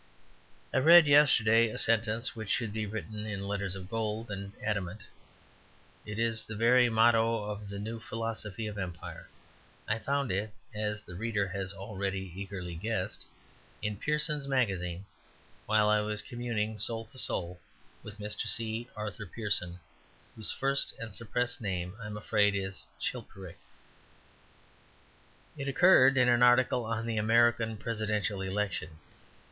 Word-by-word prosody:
I - - +2
read 165 +4 +9
yesterday 115 -6 +5
a - - -6
sentence 115 +1 +1
which 110 -3 -6
should 110 +1 0
be 110 -1 -2
written 105 +1 -5
in 100 -2 -4
letters 100 -2 -2
of 95 -1 -8
gold 110 +1 -3
and 100 0 -5
adamant; 105 -1 -3 1.0
it 105 0 -5
is 115 0 +1
the 110 - -7
very 120 +3 +5
motto 115 0 +4
of 105 -1 -6
the 100 - -6
new 110 +3 -5
philosophy 110 -1 -4
of 105 -1 -5
Empire. 90 -3 -7 0.6
I 110 +2 0
found 140 +4 -1
it 105 +3 -2 0.2
(as 105 0 -3
the 90 - -10
reader 105 +1 -1
has 95 0 -3
already 95 -2 -4
eagerly 95 -3 -6
guessed) 95 +2 -3 0.6
in 105 -1 -1
Pearson's 150 +3 0
Magazine, 95 -9 0 0.6
while 110 -1 +4
I 105 0 +4
was 105 0 -2
communing 110 -3 -3
(soul 115 -1 0
to 130 +4 -11
soul) 90 -5 -1 0.4
with 105 0 -10
Mr. 105 0 -3
C. 115 +1 -2
Arthur 105 -1 -5
Pearson, 90 -4 -2 0.6
whose 110 - 0
first 135 +1 0
and 115 -3 -7
suppressed 125 +3 -2
name 90 -3 -3
I 105 - -6
am 105 0 -6
afraid 105 -1 +2
is 95 -1 -4
Chilperic. 95 -3 -6 2.0
It 140 - -3
occurred 135 -3 +6
in 125 -1 +5
an 120 0 +4
article 125 0 +5
on 115 0 -2
the 115 -1 -2
American 115 0 +3
Presidential 105 -2 -2
Election. 95 -5 -2
110 Hz, 145 wpm, -30 LUFS, 100-115 Hz, 2.0 s, read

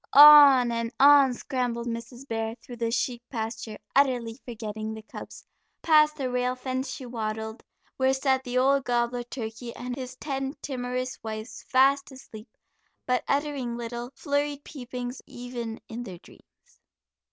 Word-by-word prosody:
On 285 -4 +9
and 230 0 -2
on 280 -1 +7
scrambled 245 -3 -2
Mrs. 235 +3 -6
Bear 225 -1 -2
through 240 +1 -11
the 230 0 -1
sheep 240 0 -1
pasture, 225 -2 -5 0.2
utterly 250 -4 +2
forgetting 220 -2 -5
the 220 - -9
cubs; - - -10 0.4
past 305 -1 +5
the 260 -4 -3
rail 250 0 0
fence 260 +1 -3
she 280 -4 -6
waddled, 220 -1 -4 0.3
where 260 0 +3
sat 265 0 +1
the 250 0 -3
old 275 +1 +3
gobbler 245 0 0
turkey 235 -1 -7
and 245 0 -5
his 255 -1 -7
ten 270 0 -4
timorous 255 -1 -3
wives, 220 +1 -6
fast 275 +2 +3
asleep, 235 -4 -12 0.6
but 250 0 +1
uttering 280 -5 -1
little, 240 +1 -5
flurried 285 -1 -1
peepings 250 -2 -7
even 240 -2 -6
in 230 +1 -6
their 190 -7 -8
dreams. 485 - -22
250 Hz, 145 wpm, -27 LUFS, 230-270 Hz, 0.6 s, On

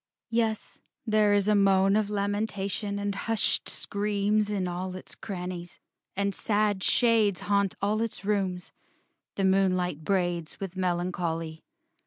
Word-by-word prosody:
VI - - -3
Yes, 220 -2 -1 0.3
there 215 -2 +3
is 205 0 +3
moan 195 -1 +4
Of 215 -1 +1
lamentation 205 0 -2
and 200 0 -2
hushed 225 +2 +1
screams 205 +1 0
In 195 -3 -1
all 180 +1 -4
its 185 - -8
crannies; 180 -3 -6 0.4
and 200 0 0
sad 205 -3 0
shades 225 -5 +3
Haunt 200 -2 +1
all 210 +2 +1
its 220 -4 -3
rooms, 190 -4 -1 0.6
the 195 - -1
moonlight 185 -4 +2
braids, 175 -3 -1
With 195 -2 -5
melancholy. 175 -3 -2
200 Hz, 130 wpm, -28 LUFS, 185-210 Hz, 0.6 s, moan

